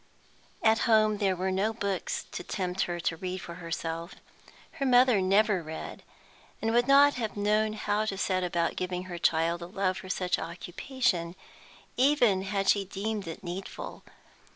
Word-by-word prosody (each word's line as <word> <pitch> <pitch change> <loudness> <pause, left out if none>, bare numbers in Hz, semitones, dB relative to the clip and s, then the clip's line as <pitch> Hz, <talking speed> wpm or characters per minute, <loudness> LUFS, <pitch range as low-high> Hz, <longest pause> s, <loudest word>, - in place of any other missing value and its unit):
At 225 0 +4
home 215 -2 +4
there 195 -3 +2
were 185 +1 -1
no 200 +4 0
books 200 -4 -3
to - - -5
tempt 185 -1 -2
her 175 0 -3
to 165 0 -1
read 185 +2 -4
for 170 - -8
herself; 165 +1 -4 0.6
her 275 - 0
mother 250 -4 +5
never 195 0 +3
read, 160 0 -7 0.6
and 225 0 -1
would 240 +1 +3
not 285 +1 +7
have 220 -4 -3
known 215 +1 +2
how 210 0 -1
to 195 -3 -3
set 185 -1 0
about 170 -1 0
giving 180 0 -3
her 175 -2 -7
child 165 +1 +1
a 170 - -6
love 185 0 -1
for 190 0 -9
such 180 -1 0
occupation, 175 +1 -2 0.6
even 250 -8 +4
had 195 0 -1
she 200 - +4
deemed 200 +1 -4
it 165 +5 -7
needful. 180 +2 -6
195 Hz, 165 wpm, -29 LUFS, 175-215 Hz, 0.6 s, not